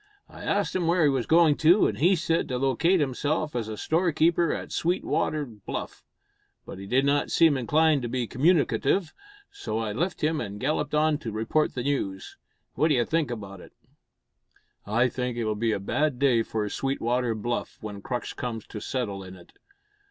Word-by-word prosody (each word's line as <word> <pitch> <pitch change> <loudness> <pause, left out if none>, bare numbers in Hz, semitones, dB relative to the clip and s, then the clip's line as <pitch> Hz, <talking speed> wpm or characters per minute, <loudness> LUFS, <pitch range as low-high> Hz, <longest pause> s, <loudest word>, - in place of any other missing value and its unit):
I - - -13
asked - - 0
him 175 -3 0
where 170 0 +3
he 150 - +5
was 130 -4 -1
going 160 -3 +5
to, 170 +6 +5
and - - -1
he 180 +5 +4
said, 165 -1 0
to 125 - -2
locate 135 +8 +2
himself 150 +2 -1
as 115 -3 -2
a 110 -1 -6
store 170 - +1
keeper 165 +2 +2
at - - -5
Sweetwater 160 -3 0
Bluff; 110 -6 -7 0.6
but - - -9
he 100 - -8
did 130 +5 +2
not 145 +1 +1
seem 165 -3 +4
inclined 150 +3 +2
to 120 - -4
be 125 0 -1
communicative, 155 - +1 0.4
so 400 - -4
I 110 -2 -2
left 170 - -2
him 155 0 +1
and 100 0 -6
galloped 150 +3 -1
on 150 -1 +2
to 120 -7 -5
report 115 +8 0
the 125 - -2
news. 100 -9 -3 0.4
What 155 - +2
d'you 130 -7 +2
think 160 -3 0
about 100 -5 -7
it?" - - -15 1.1
"I 120 +5 +2
think 125 -1 -3
it'll 110 -2 0
be 110 +2 0
a 105 - -1
bad 135 +7 0
day 125 -3 +3
for 110 -1 -2
Sweetwater 125 -1 -1
Bluff 120 +3 -3
when 105 -2 -7
Crux 120 +3 -4
comes 115 -3 -5
to 105 - -6
settle 105 -6 -3
in 95 0 -10
it. 85 -2 -17
130 Hz, 190 wpm, -26 LUFS, 115-155 Hz, 1.1 s, he